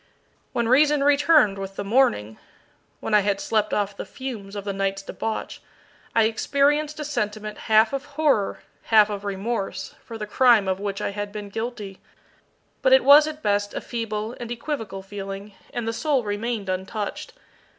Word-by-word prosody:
When 235 Hz, -1 st, 0 dB
reason 290 Hz, +3 st, +4 dB
returned 285 Hz, -7 st, +4 dB
with 195 Hz, 0 st, -6 dB
the 200 Hz, -, -4 dB
morning 195 Hz, -, +1 dB, 0.6 s
when -, -, -3 dB
I 210 Hz, -, +7 dB
had 200 Hz, -1 st, 0 dB
slept 215 Hz, -1 st, 0 dB
off 205 Hz, -1 st, -1 dB
the -, -, -5 dB
fumes 220 Hz, -7 st, -7 dB
of 200 Hz, -, -4 dB
the 200 Hz, -, -2 dB
night's 195 Hz, 0 st, -2 dB
debauch 220 Hz, +2 st, -5 dB, 0.5 s
I 225 Hz, -, +5 dB
experienced 290 Hz, +7 st, +1 dB
a 300 Hz, -, -3 dB
sentiment 215 Hz, -6 st, -3 dB
half 220 Hz, +3 st, +5 dB
of 275 Hz, +1 st, -3 dB
horror, 285 Hz, -10 st, +1 dB, 0.2 s
half 215 Hz, -2 st, +5 dB
of 205 Hz, -1 st, -5 dB
remorse, 195 Hz, -1 st, -3 dB
for 230 Hz, -, -8 dB
the 215 Hz, -, -4 dB
crime 230 Hz, -2 st, +4 dB
of 190 Hz, 0 st, 0 dB
which 200 Hz, -1 st, -3 dB
I -, -, -1 dB
had 205 Hz, 0 st, -5 dB
been 205 Hz, -1 st, -7 dB
guilty, 215 Hz, -3 st, -5 dB, 0.8 s
but -, -, +4 dB
it -, -, +6 dB
was 295 Hz, +2 st, +8 dB
at 310 Hz, 0 st, -7 dB
best 205 Hz, 0 st, 0 dB
a -, -, -1 dB
feeble 225 Hz, -1 st, -4 dB
and 240 Hz, -1 st, -6 dB
equivocal 230 Hz, -6 st, -4 dB
feeling, 195 Hz, +1 st, -7 dB, 0.2 s
and 240 Hz, -2 st, -4 dB
the 225 Hz, -, -1 dB
soul 275 Hz, +1 st, +1 dB
remained 210 Hz, 0 st, -3 dB
untouched. 195 Hz, -, -4 dB
215 Hz, 170 wpm, -24 LUFS, 200-255 Hz, 0.8 s, was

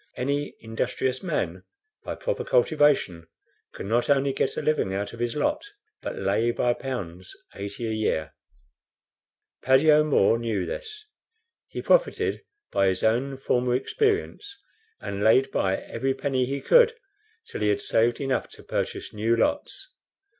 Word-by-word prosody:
Any 140 Hz, +3 st, -2 dB
industrious 125 Hz, +3 st, -2 dB
man, 185 Hz, -, -2 dB, 0.4 s
by -, -, -4 dB
proper -, -, -3 dB
cultivation, 145 Hz, -, +2 dB, 0.5 s
can -, -, -6 dB
not 120 Hz, +5 st, +1 dB
only 140 Hz, -1 st, +3 dB
get -, -, -1 dB
a -, -, 0 dB
living 150 Hz, -11 st, +1 dB
out 100 Hz, +2 st, -3 dB
of 115 Hz, -, -10 dB
his 120 Hz, -1 st, -1 dB
lot, 295 Hz, -, 0 dB, 0.4 s
but -, -, -5 dB
lay 100 Hz, +4 st, +1 dB
by 120 Hz, +1 st, +1 dB
pounds 95 Hz, -9 st, -6 dB, 0.2 s
80 100 Hz, +4 st, -6 dB
a 110 Hz, -, -2 dB
year. 105 Hz, -9 st, -1 dB, 1.3 s
Paddy 135 Hz, +4 st, +5 dB
O'Moore 150 Hz, -7 st, +4 dB
knew 110 Hz, -6 st, -1 dB
this. 430 Hz, -, -7 dB, 0.6 s
He -, -, -6 dB
profited -, -, +2 dB, 0.3 s
by 100 Hz, -, +2 dB
his 95 Hz, -1 st, 0 dB
own 125 Hz, +5 st, +1 dB
former 125 Hz, -2 st, +1 dB
experience, 410 Hz, -, -1 dB, 0.4 s
and 100 Hz, 0 st, -4 dB
laid 130 Hz, +4 st, +4 dB
by 95 Hz, 0 st, +1 dB
every 135 Hz, 0 st, -3 dB
penny 130 Hz, -2 st, 0 dB
he 140 Hz, +1 st, -3 dB
could 475 Hz, -1 st, +5 dB, 0.5 s
till -, -, -7 dB
he 105 Hz, -, +2 dB
had 105 Hz, -, +1 dB
saved 115 Hz, +1 st, +2 dB
enough 135 Hz, -2 st, -1 dB
to -, -, -14 dB
purchase -, -, -3 dB
new 110 Hz, +2 st, +1 dB
lots. 295 Hz, +11 st, -1 dB
130 Hz, 145 wpm, -25 LUFS, 110-150 Hz, 1.3 s, Paddy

